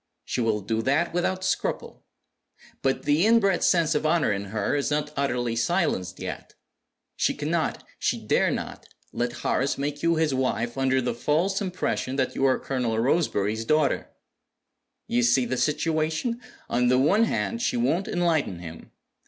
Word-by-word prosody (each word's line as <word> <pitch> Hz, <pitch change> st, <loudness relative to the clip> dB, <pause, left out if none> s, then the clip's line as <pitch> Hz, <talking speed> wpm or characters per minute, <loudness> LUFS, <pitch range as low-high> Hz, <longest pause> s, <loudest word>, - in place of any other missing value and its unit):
She 125 Hz, -, -2 dB
will 110 Hz, -2 st, +1 dB
do 110 Hz, +3 st, -1 dB
that 145 Hz, +9 st, +1 dB
without 185 Hz, +2 st, -1 dB
scruple. 185 Hz, -, -2 dB, 0.7 s
But 135 Hz, 0 st, 0 dB
the 150 Hz, +4 st, +2 dB
inbred 205 Hz, -5 st, +3 dB
sense 165 Hz, -2 st, +3 dB
of 150 Hz, -, 0 dB
honor 155 Hz, -3 st, +2 dB
in 100 Hz, 0 st, -3 dB
her 105 Hz, +5 st, -1 dB
is 140 Hz, -, 0 dB
not 150 Hz, 0 st, -1 dB
utterly 120 Hz, -4 st, -1 dB
silenced 115 Hz, -, 0 dB
yet. -, -, -7 dB, 0.6 s
She -, -, +1 dB
cannot, -, -, -1 dB, 0.2 s
she -, -, 0 dB
dare -, -, +3 dB
not, -, -, -5 dB, 0.2 s
let 120 Hz, 0 st, -1 dB
Horace 135 Hz, +2 st, +1 dB
make 145 Hz, +1 st, -3 dB
you 170 Hz, 0 st, +2 dB
his 160 Hz, -3 st, +1 dB
wife 125 Hz, -2 st, -1 dB
under 130 Hz, -1 st, +1 dB
the 120 Hz, -1 st, -1 dB
false 160 Hz, -, 0 dB
impression 180 Hz, -8 st, -2 dB
that 130 Hz, -2 st, 0 dB
you 135 Hz, -, 0 dB
are 130 Hz, -1 st, +3 dB
Colonel 125 Hz, -4 st, -2 dB
Roseberry's 115 Hz, -, +1 dB
daughter. 155 Hz, +4 st, +1 dB, 1.0 s
You 120 Hz, -, +1 dB
see 120 Hz, +1 st, +3 dB
the 125 Hz, +2 st, -2 dB
situation? 160 Hz, -, 0 dB, 0.3 s
On 125 Hz, +1 st, +1 dB
the 125 Hz, +1 st, +4 dB
one 190 Hz, -, +4 dB
hand, 230 Hz, +1 st, -2 dB
she 245 Hz, 0 st, 0 dB
won't 195 Hz, -6 st, +1 dB
enlighten 165 Hz, -, 0 dB
him. 85 Hz, -1 st, -10 dB
140 Hz, 160 wpm, -25 LUFS, 120-170 Hz, 1.0 s, the